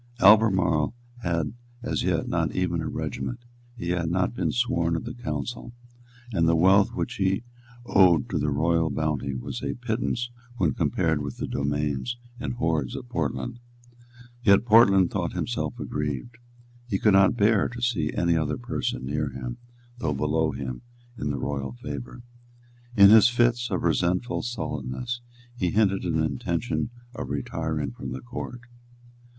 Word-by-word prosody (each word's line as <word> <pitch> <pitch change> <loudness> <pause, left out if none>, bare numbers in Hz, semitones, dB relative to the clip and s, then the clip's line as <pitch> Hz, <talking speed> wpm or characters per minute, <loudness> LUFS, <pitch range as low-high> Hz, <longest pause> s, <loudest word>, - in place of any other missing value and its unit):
Albemarle 95 -4 +5 0.3
had 85 -5 -1 0.3
as 80 - -1
yet - - 0
not - - -1
even - - 0
a - - -3
regiment; 65 - -4 0.3
he 85 -6 -4
had 85 -2 0
not 90 +5 +1
been - - -1
sworn 85 -10 +1
of 80 - -3
the 120 - -5
Council; 120 0 -5 0.6
and 85 -3 +2
the 85 - +4
wealth 95 +4 +4
which 85 -2 -3
he 95 +3 +1 0.4
owed 90 -8 +5
to - - -1
the 75 - 0
royal 80 +3 +2
bounty 70 -3 -1
was 60 - -5
a - - -2
pittance 120 0 -2 0.3
when 80 - +2
compared 80 -2 +1
with 70 -3 -5
the - - -3
domains 75 - -1 0.2
and 125 - -3
the - - -10
hoards 80 - 0
of - - -7
Portland. 120 0 -2 0.8
Yet 100 -1 +5
Portland 100 -5 +6
thought - - -2
himself - - -3
aggrieved. 75 - -4 0.5
He 100 - +1
could 105 +1 +3
not 95 +4 +5
bear 105 -1 +3
to 120 - -8
see 105 -11 0
any 85 -1 +1
other 75 -2 0
person 60 +1 -3
near 75 +2 -1
him, 65 -2 -6 0.4
though 75 -10 -1
below 75 +3 +1
him, 65 -2 -5 0.3
in 75 -10 -3
the 70 - -1
royal 70 -2 -3
favour. 70 - -7 0.7
In 100 0 +9
his 110 +1 +8
fits 120 0 +2
of 95 -4 -1
resentful 90 +7 +1
sullenness, 120 - -4 0.3
he 90 -7 0
hinted 100 -1 +2
an 80 -2 0
intention 85 - -1 0.2
of 65 - -6
retiring 75 +1 -2
from - - -7
the 65 - -6
Court. 120 - -7
85 Hz, 155 wpm, -26 LUFS, 75-110 Hz, 0.8 s, In